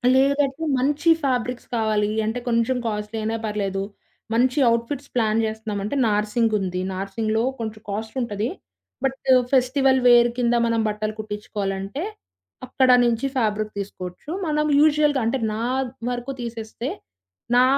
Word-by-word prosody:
లేదంటే 280 +2 +2 0.2
మంచి 295 +5 +1
ఫ్యాబ్రిక్స్ 250 -2 -1
కావాలి. 215 -2 +1 0.2
అంటే 225 +3 -1
కొంచెం 230 +2 +2
కాస్ట్‌లీ 210 +1 -3
అయినా 225 +1 -1
పర్లేదు 200 -2 -2 0.5
మంచి 250 +4 +2
ఔట్‌ఫిట్స్ 255 +5 -3
ప్లాన్ 220 -2 +2
జేస్తున్నామంటే 215 +1 -3
నార్సింగ్ 215 +2 +1
ఉంది. 185 -1 -2
నార్సింగ్‌లో 215 +3 -1 0.2
కొంచెం 220 -1 -5
కాస్ట్‌ 220 +3 -4
ఉంటది 215 -1 -2 0.5
బట్ 270 0 0 0.4
ఫెస్టివల్ 265 +1 +3
వేర్ 240 0 +7
కింద 240 -1 +2
మనం 230 -1 +1
బట్టలు 215 0 -2
కుట్టించుకోవాలంటే 205 +2 -4 0.7
అక్కడ 260 +1 +2 0.2
నుంచి 235 +2 +1
ఫ్యాబ్రిక్ 215 -2 0
తీసుకోవచ్చు. 185 +3 -7 0.2
మనం 300 0 +1
యూజువల్‌గా 295 -2 +4
అంటే 240 +4 +1 0.2
నా 220 - -3 0.5
వరకు 245 +2 -4
తీసేస్తే 230 +1 -5 0.7
నా 250 - +7
225 Hz, 125 wpm, -23 LUFS, 210-255 Hz, 0.7 s, వేర్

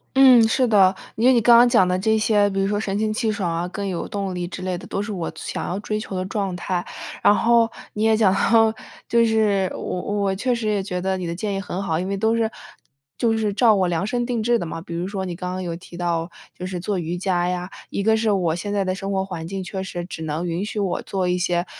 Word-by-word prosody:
嗯， 260 -3 +8
是 255 +3 +2
的。 195 -4 +5 0.2
因 230 +3 +2
为 260 - +7
你 240 - +4
刚 235 +1 +6
刚 240 +1 +7
讲 220 -7 +4
的 180 0 +1
这 220 +3 +2
些， 210 -2 +3
比 195 0 -2
如 195 - +1
说 205 +1 0
神 200 -2 -2
清 215 0 0
气 220 0 0
爽 200 -5 -2
啊， 170 +1 -2
更 200 +2 -4
有 180 -3 -3
动 195 -2 -3
力 175 -1 -3
之 185 - -7
类 185 -1 -1
的， - - -10
都 195 - -2
是 210 +1 -4
我 175 -4 -3
想 - - -5
要 185 - -2
追 215 +1 -3
求 200 - -6
的 185 0 -2
状 195 -1 -2
态。 180 0 -2 0.4
然 205 - +7
后， 230 +1 +3 0.2
你 210 - -2
也 220 0 +4
讲 200 -4 +4
到， 225 +2 +4 0.3
就 235 0 +3
是 210 -4 +2
我 180 - -4
我 200 -1 -1
确 250 +6 0
实 230 -2 -3
也 210 -2 +1
觉 180 -2 -3
得 190 +1 -1
你 180 -2 -4
的 170 - -3
建 205 +2 -3
议 195 - -2
很 190 -1 -4
好， 160 -3 -1
因 185 - -3
为 200 - -2
都 220 +3 +2
是 225 -1 +1 0.7
就 225 -2 +2
是 210 -2 0
照 220 +1 +5
我 185 -2 +2
量 175 +2 -1
身 240 +3 -1
定 240 -2 -1
制 235 +2 +2
的 175 - -4
嘛。 165 0 -6
比 170 -1 -7
如 175 +2 -2
说 195 -2 -3
你 175 -2 -4
刚 180 0 -4
刚 185 0 -4
有 170 -2 -4
提 175 0 -12
到， 170 -1 -1 0.3
就 180 - -5
是 185 -1 -4
做 190 +2 -2
瑜 170 0 -3
伽 180 -1 0
呀， 180 0 -3 0.2
一 - - -2
个 220 +2 +3
是 220 -1 +1
我 175 -5 +1
现 205 +4 -4
在 200 -1 +1
的 185 0 -1
生 195 0 -4
活 190 -1 0
环 170 -4 -6
境 195 +1 -4
确 190 +1 -5
实 175 -2 -5
只 160 -2 -7
能 160 +3 -3
允 170 +4 -2
许 210 0 -4
我 195 -3 -1
做 190 -2 -2
一 180 0 +1
些 175 -1 0
195 Hz, 295 characters per minute, -22 LUFS, 180-215 Hz, 0.7 s, 嗯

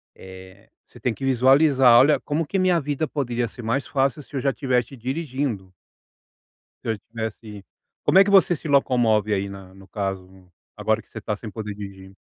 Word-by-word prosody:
eh, 95 +2 -14 0.2
você 120 - -17
tem 120 +1 -1
que 135 - -6
visualizar: 130 -1 +5
"Olha, 150 +3 +4
como 155 +2 -2
que 195 +6 -2
minha 185 -2 +3
vida 145 +2 -2
poderia 120 -5 -2
ser 120 - -11
mais 120 +5 -1
fácil, 135 0 0
se 140 - -14
eu 135 - -1
já 135 - +1
estivesse 130 -2 -1
dirigindo". 130 - -4 1.1
Se - - -3
eu 110 - -1
tivesse 110 -2 -7 0.4
como 190 - +5
é 195 - +7
que - - -1
você 190 -4 +5
se 160 - -8
locomove 120 -7 +2
aí 100 0 -1
na 95 -1 -11
no 95 0 -16
caso, 95 -2 -6 0.2
agora 110 0 0
que - - -32
você 110 - -8
está 110 0 -3
sem 110 +2 -7
poder 105 0 -6
dirigir? 95 -2 -10
120 Hz, 190 wpm, -23 LUFS, 100-140 Hz, 1.1 s, é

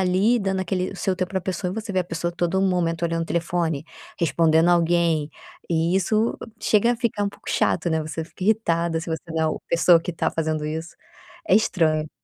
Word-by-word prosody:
ali, 190 +6 +3
dando 195 -1 -1
aquele 185 0 -2
o - - -9
seu 190 0 0
tempo 185 0 -3
pra 190 - -1
pessoa 185 0 -3
e 185 - -5
você 220 -1 -5
vê 190 - +1
a - - -2
pessoa 170 0 -3
todo 175 +2 0
momento 175 -3 0
olhando 165 0 0
o - - -5
telefone, 165 -3 -1 0.3
respondendo 165 0 +3
alguém, 170 -3 +2 0.4
e 165 +1 +1
isso 215 +4 +1 0.2
chega 225 +3 +3
a - - -3
ficar 230 -4 -1
um - - 0
pouco - - -13
chato, 175 - +1
né, 160 0 +1
você 160 +1 -5
fica 170 - -12
irritada 170 -6 +1
se 165 - -8
você 160 - -3
não 160 0 -1
é - - +2
o 155 - -2
pessoa 170 0 +5
que 175 +1 -5
tá - - -1
fazendo 155 -1 -1
isso. 160 +2 -5 0.5
É - - +5
estranho. 160 -7 +2
170 Hz, 215 wpm, -23 LUFS, 165-190 Hz, 0.5 s, pessoa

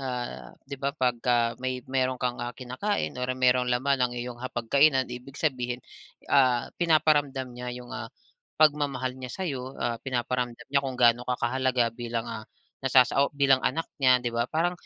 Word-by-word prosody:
ah, 120 - -5
'di 140 - -7
ba 140 - 0
'pagka 120 -2 +1
may 130 -1 -3
mayroon 130 -1 0
kang, 125 -1 -2
ah, 120 0 -5
kinakain 130 +12 -2
or 125 - -2
mayroong 125 -1 +3
laman 130 +2 +1
ang 125 -1 +2
iyong 120 0 -6
hapag-kainan 130 +3 +2
ibig 125 +3 -9
sabihin, 125 -5 -1 0.6
ah, 125 -3 +3
pinaparamdam 145 -5 +2
niya 125 0 -6
'yong, 125 -1 -10
ah, 110 0 -5 0.5
pagmamahal 145 -4 +2
niya 125 - -6
sa'yo. 135 -6 -5
Ah, 120 -1 -1
pinaparamdam 125 -2 -2
niya 140 - +4
kung 130 -2 -4
ga'no 120 0 +3
ka 125 - +1
kahalaga 125 -1 +1
bilang, 115 -1 -4
ah, 115 -2 -6 0.4
nasasa 135 +1 +4
bilang 135 -2 +4
anak 160 +5 0 0.2
niya 125 -2 +4
'di 120 - -1
ba? 115 +1 0
Parang, 170 +3 +1
125 Hz, 165 wpm, -27 LUFS, 120-135 Hz, 0.6 s, niya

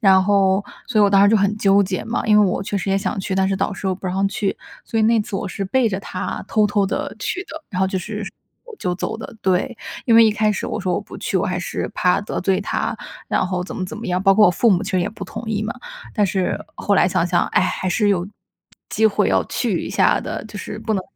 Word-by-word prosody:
然 190 -4 +5
后 195 0 +3 0.2
所 225 -3 0
以 205 - +7
我 200 - +3
当 195 0 +5
时 200 - +6
就 225 - +5
很 200 0 +2
纠 200 0 +4
结 185 -1 -2
嘛， 230 - -2
因 210 -1 +6
为 205 - +5
我 185 - -1
确 205 0 -2
实 190 - -4
也 195 - +3
想 195 0 -2
去， 190 - -3
但 190 0 +2
是 195 - 0
导 195 +2 -1
师 195 - -5
又 190 - +1
不 190 +1 -8
让 190 +2 +1
去。 200 0 -2 0.3
所 225 - -2
以 - - +3
那 225 0 +4
次 205 - -4
我 - - -3
是 195 +1 -4
背 255 +5 +2
着 190 -2 -3
他 185 0 -5
偷 215 -1 +3
偷 205 -1 +1
地 - - -3
去 365 0 -3
的， 320 -5 -9
然 185 - -5
后 190 - +3
就 190 0 -2
是 210 +2 -5 0.5
就 180 - -1
走 205 +4 -4
的 230 - -8
对， 190 +6 +1 0.3
因 230 - +4
为 230 0 +8
一 220 - +5
开 215 0 +2
始 205 - -2
我 - - -3
说 185 -2 0
我 - - -1
不 - - -11
去， - - -2
我 - - +1
还 - - -1
是 - - -4
怕 180 +1 +2
得 205 - -4
罪 190 0 +1
他， 200 - -2 0.3
然 185 - +1
后 180 -1 -2
怎 180 - -7
么 185 - -2
怎 185 - -7
么 235 - -6
样。 180 0 0
包 195 0 +5
括 210 0 +6
我 - - +5
父 225 +6 +3
母 185 +1 +3
其 200 - -4
实 185 - +2
也 175 - -1
不 215 - -8
同 - - -7
意 215 -1 -1
嘛， 215 - -3 0.4
但 210 - +3
是 190 -1 0 0.2
后 205 - 0
来 185 - +4
想 180 -1 +1
想， 175 0 +2
哎， - - +2
还 - - -1
是 205 +3 +2
有 185 -2 +1 0.6
机 220 - +3
会 205 - +2
要 - - +2
去 - - -1
一 - - -5
下 - - +3
的， - - -5
就 210 - -10
是 210 - -6
不 220 0 -2
能 190 - -1
200 Hz, 305 characters per minute, -21 LUFS, 190-215 Hz, 0.6 s, 为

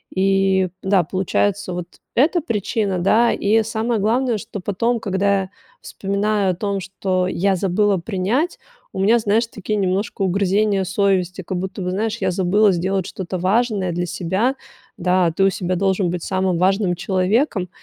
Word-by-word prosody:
И, 190 -1 +2
да, 190 -2 +3
получается 190 +2 -1
вот 175 0 -5 0.3
эта 320 +7 +3
причина, 210 - -1
да, 225 +6 +3
и 220 +2 +2
самое 225 +1 -1
главное, 235 +2 +1
что 210 -1 -7
потом, 230 +5 -1
когда 200 -1 +1
я 185 - -10 0.3
вспоминаю 200 0 -1
о 180 - -4
том, 200 +1 -2
что 190 -1 -2
я 190 +1 +1
забыла 195 +2 +1
принять, 210 - -1 0.4
у 190 - -3
меня, 220 +5 +4
знаешь, 220 +1 +1
такие 210 -1 -4
немножко 195 +2 -1
угрызения 195 +1 +1
совести, 190 -1 0
как 185 +1 -4
будто 190 +2 -5
бы, 180 - -2
знаешь, 210 +4 -1
я 190 -1 0
забыла 195 +3 +3
сделать 185 +1 -1
что-то 185 -1 -5
важное 195 -1 +1
для 175 +1 -2
себя, 190 +9 -1 0.4
да. 180 -1 +2
Ты 195 - +3
у 195 - +5
себя 185 -1 -2
должен 190 -1 +1
быть 180 - -3
самым 185 -2 0
важным 190 0 +2
человеком 190 - 0
195 Hz, 160 wpm, -20 LUFS, 185-210 Hz, 0.4 s, у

